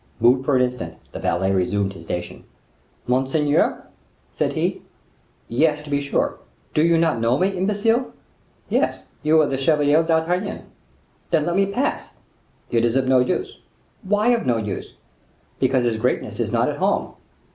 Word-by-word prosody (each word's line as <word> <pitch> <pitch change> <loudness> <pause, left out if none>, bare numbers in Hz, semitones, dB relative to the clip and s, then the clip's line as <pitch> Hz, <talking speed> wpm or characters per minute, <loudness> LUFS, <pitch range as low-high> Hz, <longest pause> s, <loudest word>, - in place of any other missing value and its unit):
Moved 125 +3 +4
for 140 - +2
an 125 - +4
instant 125 -11 -4 0.2
the - - -7
valet 95 +2 0
resumed 95 +1 0
his 85 -3 -12
station. 90 +1 -5 0.6
"Monseigneur?" 135 +4 +1 0.5
said - - -1
he. - - -1 0.7
"Yes, 150 +5 +1
to 150 - -10
be 140 0 +1
sure; 140 - -1 0.3
do 155 - +3
you 170 0 +4
not 165 -6 +2
know 115 +3 +2
me, 185 +2 +2
imbecile?" 210 +6 0 0.6
"Yes; - - 0 0.2
you 155 +1 +4
are 155 - +5
the 135 - -2
Chevalier 150 +1 +3
d'Artagnan." 165 +4 0 0.7
"Then 160 -3 +2
let 175 - -1
me 195 0 +3
pass." 250 +7 -2 0.6
"It 115 -1 +2
is 120 +1 +1
of 135 -1 +1
no 130 -1 +5
use." 380 - -1 0.4
"Why 210 +2 +1
of 240 -1 +2
no 120 -2 +1
use?" 105 -4 -5 0.6
"Because 130 -2 +2
His 115 -2 0
Greatness 110 - -1
is - - -1
not - - +2
at - - -2
home." - - 0
145 Hz, 165 wpm, -22 LUFS, 120-170 Hz, 0.7 s, are